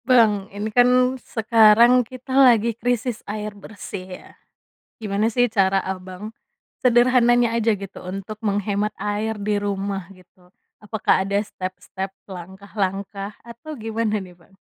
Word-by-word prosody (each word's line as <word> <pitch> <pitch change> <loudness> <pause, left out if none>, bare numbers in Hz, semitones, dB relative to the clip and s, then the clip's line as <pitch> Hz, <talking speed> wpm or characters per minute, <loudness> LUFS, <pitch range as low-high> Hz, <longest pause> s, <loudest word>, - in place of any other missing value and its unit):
Bang, 215 -6 +4
ini 210 +2 -5
kan 250 +1 +4
sekarang 225 +2 +5
kita 255 +2 -8
lagi 235 -4 +5
krisis 240 0 -2
air 210 0 -4
bersih 200 -2 -9 0.2
ya? - - -16 0.7
Gimana 210 +1 0
sih 245 +2 +3
cara, 195 -3 +2
Abang, 190 +3 -7 0.5
sederhananya 240 -1 +4
aja 230 -1 +2
gitu 195 -1 -9
untuk 195 +3 -6
menghemat 205 0 0
air 210 +1 -2
di 210 +1 -1
rumah 200 -1 -2
gitu, 180 -1 -21 0.3
apakah 210 -2 +1
ada 200 +1 0
step-step, 190 -1 -6 0.2
langkah-langkah 195 +2 -5
atau 235 +6 -11
gimana 220 -1 -1
nih, 185 -2 -11
Bang? 180 +3 -25
210 Hz, 125 wpm, -22 LUFS, 195-230 Hz, 0.7 s, sekarang